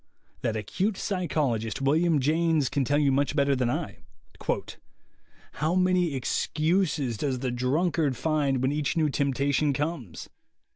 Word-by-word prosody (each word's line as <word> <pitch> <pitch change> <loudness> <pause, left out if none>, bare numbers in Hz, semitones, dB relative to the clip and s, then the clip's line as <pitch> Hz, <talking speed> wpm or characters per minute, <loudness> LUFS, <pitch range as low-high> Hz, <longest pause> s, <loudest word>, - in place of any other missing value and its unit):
That 115 -3 -1
acute 190 - -2
psychologist, 145 - -1
William 155 +3 +2
James, 155 0 +2
can 140 - 0
tell 145 +3 +1
you 145 -2 +3
much 140 +2 +1
better 140 -1 +3
than 125 -2 0
I: - - -3 1.5
"How 155 +4 -1
many 180 -4 +2
excuses 155 - 0
does 135 +2 -1
the 125 0 -2
drunkard 140 +3 0
find 145 -5 0
when 130 - +2
each 150 +2 -1
new 155 -2 +2
temptation 140 +1 +1
comes! 145 - -4
145 Hz, 135 wpm, -27 LUFS, 130-160 Hz, 1.5 s, you